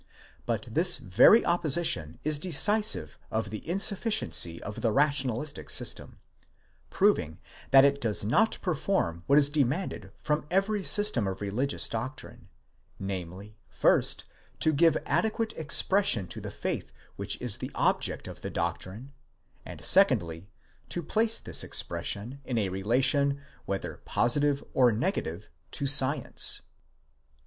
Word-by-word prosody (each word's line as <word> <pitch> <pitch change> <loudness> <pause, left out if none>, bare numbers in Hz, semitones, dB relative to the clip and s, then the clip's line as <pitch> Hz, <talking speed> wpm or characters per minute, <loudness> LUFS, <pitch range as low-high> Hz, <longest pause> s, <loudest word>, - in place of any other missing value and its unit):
But - - -2
this - - +4
very 95 - +5
opposition 155 - 0
is 150 -1 -1
decisive 205 +6 +2
of 110 -2 -3
the 110 +8 -8
insufficiency 195 - +1
of 105 - -7
the 115 - +1
rationalistic 140 +1 -1
system, - - -4 0.7
proving 80 +6 +1 0.3
that 135 0 +7
it 140 0 +1
does 110 -4 -1
not 125 - +1
perform 155 - -1
what 140 - +4
is 145 -2 +5
demanded 145 - -2
from 150 -1 -1
every 195 +2 0
system 205 - +1
of 95 0 -4
religious 110 +8 -1
doctrine: 120 +6 -7 0.5
namely, 95 +2 -7
first, - - +1 0.4
to 155 - +3
give 165 +3 +3
adequate 220 +8 -1
expression 160 - +2
to - - -7
the - - -6
faith - - -5 0.2
which 100 0 -2
is 125 -4 -1
the - - -6
object - - 0
of - - -10
the - - -5
doctrine; 115 +9 -5 0.5
and - - -9
secondly, 85 +3 +2 0.4
to 175 - -3
place 220 +7 +1
this - - -1
expression 100 +10 -3
in 125 -2 -3
a 100 -4 0
relation, 130 +8 +1 0.3
whether 100 0 -5
positive 145 +3 +1
or 125 -2 +4
negative, 105 - -3 0.2
to 140 - -4
science. 140 +1 +3
135 Hz, 130 wpm, -28 LUFS, 100-165 Hz, 0.7 s, that